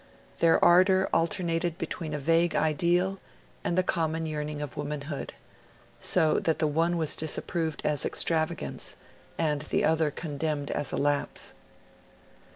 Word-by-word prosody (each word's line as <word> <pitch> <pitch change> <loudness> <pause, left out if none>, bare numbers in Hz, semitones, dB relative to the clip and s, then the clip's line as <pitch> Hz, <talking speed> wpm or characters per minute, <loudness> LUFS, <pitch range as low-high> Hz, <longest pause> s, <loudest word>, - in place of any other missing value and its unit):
Their 165 -1 +5
ardor 185 +2 +5
alternated 170 0 0
between 160 -1 -4
a - - -1
vague 165 +4 +2
ideal 175 +5 +1 0.4
and 175 - -1
the 185 - +4
common 165 -2 -1
yearning 150 -1 -3
of 145 -2 -5
womanhood; 145 -1 -4 0.7
so 155 -1 +2
that 160 -2 0
the 155 - +1
one 165 +3 +1
was 160 -2 +1
disapproved 160 +1 -1
as 150 -1 +1
extravagance, 160 - -1 0.4
and 150 -3 0
the 150 - 0
other 160 -1 +2
condemned 150 -1 -3
as 145 - -1
a - - -2
lapse. 145 0 -1
160 Hz, 135 wpm, -28 LUFS, 150-170 Hz, 0.7 s, Their